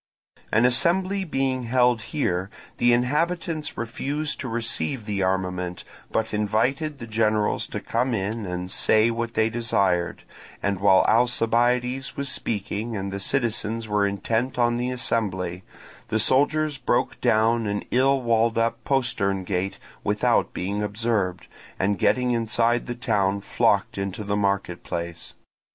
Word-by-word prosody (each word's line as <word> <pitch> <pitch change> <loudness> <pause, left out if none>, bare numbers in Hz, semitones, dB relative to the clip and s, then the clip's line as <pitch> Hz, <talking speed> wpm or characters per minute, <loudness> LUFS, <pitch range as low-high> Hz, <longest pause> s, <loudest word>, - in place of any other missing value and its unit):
An 115 +3 +4
assembly 185 +10 +2
being 135 -5 -1
held 125 -1 +3
here, 95 - -2 0.3
the 120 0 +4
inhabitants 155 +6 0
refused 140 +6 -3
to 130 - -4
receive 115 +1 -2
the 100 -2 -2
armament, 90 -1 -1 0.3
but 110 0 -1
invited 120 +8 0
the 120 - -7
generals 110 -1 +1
to - - -5
come 120 +1 -1
in 105 +3 -2
and 90 0 -4
say 110 +3 +3
what 115 0 -3
they 110 - +3
desired; 100 -6 0 0.4
and 100 -2 0
while 95 -1 +5
Alcibiades 125 +2 +2
was 140 -1 -2
speaking 110 0 -2
and 95 0 -4
the 100 - -4
citizens 115 -1 -1
were 105 -1 +2
intent 110 +6 -1
on 120 -1 +2
the 125 +1 -1
assembly, 95 -8 -1 0.5
the 110 0 0
soldiers 145 +5 +2
broke 120 +1 0
down 115 -1 +2
an 100 0 -2
ill 135 +1 +3
walled 115 -1 +2
up 115 +1 0
postern 100 -8 0
gate 95 +1 -2 0.3
without - - +1
being 100 +3 -3
observed, 105 -3 -1 0.3
and 100 +1 0
getting 125 -1 +2
inside 115 +1 +1
the 120 - -3
town, 100 -5 0
flocked 100 - +1
into 100 +2 -3
the 100 0 -1
marketplace. 90 -4 -3
115 Hz, 140 wpm, -24 LUFS, 100-125 Hz, 0.5 s, while